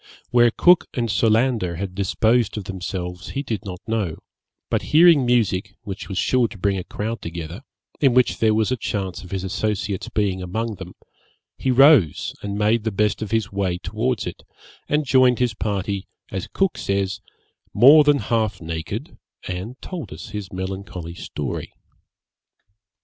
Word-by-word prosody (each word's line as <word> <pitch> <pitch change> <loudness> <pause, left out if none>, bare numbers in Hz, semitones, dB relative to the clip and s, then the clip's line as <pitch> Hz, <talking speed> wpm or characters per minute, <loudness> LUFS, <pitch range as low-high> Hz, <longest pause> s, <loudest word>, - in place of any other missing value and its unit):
Where 120 -1 +6
Cook 175 +9 +4
and 115 -3 0
Solander 110 -3 +2
had 95 +2 -4
disposed 110 +4 +1
of 105 - -3
themselves 90 -1 -5
he 140 - -3
did 110 -6 -4
not 90 -1 -7
know; 110 -8 -2 0.5
but - - +1 0.2
hearing 160 -6 +7
music, 110 -6 +1
which 100 -2 -7
was 95 - -4
sure 125 +2 +2
to 105 - -12
bring 100 +1 +1
a 95 - -3
crowd 110 +5 -4
together, 85 +4 -6 0.4
in 135 -4 +3
which 125 -1 +3
there 110 -1 +3
was 110 +2 +1
a - - +2
chance 95 -6 -3
of 90 - -11
his 95 -1 -3
associates 100 0 -2
being 100 -3 0
among 110 +4 -3
them, 90 -1 -9 0.6
he 130 - -2
rose, 130 - +5
and 100 0 -4
made 105 +2 +2
the 110 - 0
best 105 +1 0
of 110 - -3
his 110 -4 0
way 95 -3 -1
towards 110 +5 -2
it, 90 - -6 0.5
and 150 0 +1
joined 130 -2 +4
his 125 -2 +1
party, 100 -2 -3 0.2
as 95 -1 -4
Cook 190 -10 0
says, 100 0 -1 0.5
'more 140 +8 +8
than 145 -1 +4
half 110 -4 -1
naked, 85 - -6 0.3
and 95 +8 -5
told 165 - -6
us 80 +3 -8
his 105 -3 -6
melancholy 95 -2 -5
story.' - - -5
105 Hz, 165 wpm, -22 LUFS, 95-120 Hz, 0.6 s, more